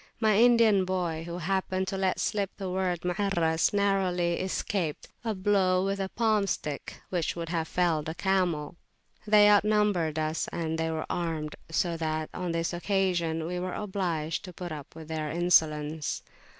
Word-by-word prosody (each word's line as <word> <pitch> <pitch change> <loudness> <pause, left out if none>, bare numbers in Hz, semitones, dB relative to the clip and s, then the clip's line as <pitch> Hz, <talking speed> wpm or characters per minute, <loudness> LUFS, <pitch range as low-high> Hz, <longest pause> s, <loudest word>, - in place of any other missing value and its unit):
My 215 -2 +3
Indian 230 -4 +5
boy, 175 -3 -2
who 170 0 -4
happened 190 +1 -1
to 195 - -3
let 190 -1 0
slip 200 -3 0
the 190 -2 -4
word 180 -2 -1
"Muarras," 180 -3 +1
narrowly 190 -4 +1
escaped 185 -3 -2
a 220 -2 -1
blow 190 -1 +2
with 195 0 -1
a 190 -1 -2
palm 215 -3 +1
stick, 150 -6 -4
which 175 -3 -1
would 170 -1 -5
have 165 -2 -1
felled 160 -4 0
a 160 - -5
camel. 175 -5 0 0.5
They 210 -1 +7
outnumbered 205 -6 +3
us, 155 +1 -1
and 160 -1 -2
they 160 0 0
were 160 -1 -2
armed; 160 -3 -3
so 170 0 0
that, 155 -1 -2
on 180 -1 -3
this 165 +1 -1
occasion, 175 -3 0
we 180 +2 -3
were 185 0 -3
obliged 180 -6 -2
to 180 - -9
put 175 0 -6
up 150 -1 -8
with 160 -1 -9
their 155 -1 -3
insolence. 155 -3 +1
180 Hz, 165 wpm, -28 LUFS, 160-195 Hz, 0.5 s, They